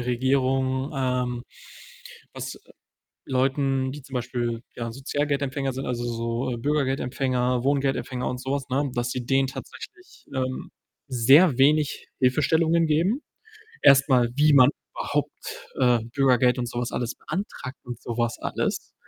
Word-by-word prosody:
Regierung, 130 Hz, +2 st, 0 dB
ähm, 125 Hz, -2 st, -1 dB, 0.9 s
was -, -, -6 dB, 0.7 s
Leuten, 135 Hz, 0 st, +1 dB
die 145 Hz, -1 st, -9 dB
zum 135 Hz, -, -14 dB
Beispiel, 120 Hz, -2 st, -2 dB
ja, 115 Hz, -1 st, -4 dB
Sozialgeldempfänger 140 Hz, +1 st, -2 dB
sind, 135 Hz, +2 st, -4 dB
also, 120 Hz, -1 st, -2 dB
so 120 Hz, +1 st, -2 dB
Bürgergeldempfänger, 130 Hz, -2 st, 0 dB
Wohngeldempfänger 135 Hz, -2 st, 0 dB
und 125 Hz, -, -4 dB
so 130 Hz, +1 st, -4 dB
was, 140 Hz, -1 st, -2 dB
ne, 135 Hz, +1 st, 0 dB
dass 120 Hz, 0 st, -1 dB
sie 125 Hz, -1 st, -4 dB
denen 135 Hz, +1 st, +2 dB
tatsächlich, 350 Hz, -, -10 dB
ähm, 130 Hz, 0 st, -3 dB, 0.4 s
sehr 135 Hz, +4 st, +5 dB
wenig 145 Hz, +2 st, +2 dB
Hilfestellungen 160 Hz, +5 st, +3 dB
geben. 175 Hz, -, +1 dB, 0.6 s
Erst 135 Hz, +1 st, +6 dB
mal, 125 Hz, -3 st, +4 dB
wie 150 Hz, +1 st, +4 dB
man 130 Hz, -3 st, +8 dB, 0.2 s
überhaupt, -, -, -4 dB
äh, 125 Hz, -2 st, +4 dB, 0.2 s
Bürgergeld 130 Hz, -2 st, +4 dB
und 120 Hz, -1 st, -2 dB
so 120 Hz, -, -4 dB
was 120 Hz, 0 st, -3 dB
alles 120 Hz, 0 st, -2 dB
beantragt 160 Hz, -9 st, -5 dB
und 120 Hz, -1 st, -7 dB
so 120 Hz, -1 st, -5 dB
was 120 Hz, 0 st, 0 dB
alles. -, -, -3 dB
130 Hz, 135 wpm, -25 LUFS, 125-140 Hz, 0.9 s, man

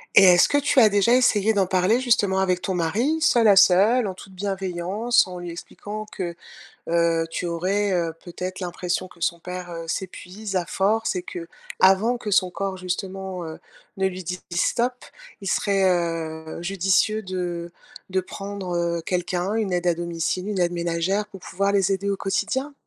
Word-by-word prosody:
Et 195 Hz, -, +9 dB
est-ce 180 Hz, -1 st, +7 dB
que 290 Hz, -, +2 dB
tu 285 Hz, -1 st, +3 dB
as 220 Hz, -3 st, +7 dB
déjà 205 Hz, +3 st, +3 dB
essayé 220 Hz, -4 st, +3 dB
d'en 200 Hz, -2 st, +2 dB
parler, 185 Hz, +5 st, +2 dB
justement, 215 Hz, -7 st, +2 dB
avec 185 Hz, -2 st, +1 dB
ton 190 Hz, -, -2 dB
mari, 215 Hz, -, +1 dB
seuls 240 Hz, -8 st, +4 dB
à 200 Hz, -, +7 dB
seuls, 200 Hz, +6 st, +5 dB
en 190 Hz, -, -3 dB
toute 190 Hz, +1 st, -13 dB
bienveillance, 195 Hz, +4 st, 0 dB
en 180 Hz, -2 st, -8 dB
lui 175 Hz, 0 st, -6 dB
expliquant 205 Hz, +5 st, -7 dB
que, 175 Hz, -2 st, -4 dB, 0.5 s
heu, 165 Hz, -1 st, +2 dB
tu 175 Hz, -, -3 dB
aurais, 190 Hz, +4 st, 0 dB
heu, 170 Hz, -2 st, 0 dB
peut-être 185 Hz, +1 st, -6 dB
l'impression 180 Hz, 0 st, -3 dB
que 180 Hz, -, -18 dB
son 170 Hz, +1 st, 0 dB
père, 180 Hz, +1 st, -7 dB
heu, 165 Hz, -1 st, -6 dB
s'épuise 190 Hz, +3 st, -5 dB
à 175 Hz, -2 st, 0 dB
force 220 Hz, +4 st, +1 dB
et 180 Hz, -, -2 dB
qu'avant 190 Hz, +6 st, +1 dB
que 210 Hz, -3 st, -5 dB
son 185 Hz, -1 st, +3 dB
corps, 195 Hz, +1 st, -3 dB
justement, 185 Hz, 0 st, -4 dB
heu, 160 Hz, 0 st, -8 dB, 0.4 s
ne 190 Hz, 0 st, +2 dB
lui 185 Hz, 0 st, -7 dB
dise: 180 Hz, +2 st, -5 dB
«Stop», 240 Hz, +8 st, 0 dB, 0.4 s
il -, -, -7 dB
serait, 200 Hz, -2 st, +1 dB
heu, 165 Hz, -3 st, -2 dB
judicieux 195 Hz, +4 st, +1 dB
de 175 Hz, -3 st, -4 dB, 0.4 s
de 190 Hz, 0 st, +1 dB
prendre, 195 Hz, -1 st, -6 dB
heu, 170 Hz, 0 st, 0 dB
quelqu'un, 180 Hz, +3 st, -1 dB
une 215 Hz, -4 st, -1 dB
aide 180 Hz, 0 st, 0 dB
à 175 Hz, -, +3 dB
domicile, 170 Hz, +2 st, -2 dB
une 205 Hz, -2 st, -2 dB
aide 175 Hz, -1 st, +2 dB
ménagère, 175 Hz, +4 st, -1 dB
pour 205 Hz, -2 st, -12 dB
pouvoir 200 Hz, +4 st, -1 dB
les 195 Hz, -2 st, +2 dB
aider 195 Hz, +1 st, -1 dB
au 200 Hz, -, 0 dB
quotidien? 220 Hz, +9 st, -1 dB
185 Hz, 180 wpm, -24 LUFS, 175-200 Hz, 0.5 s, Et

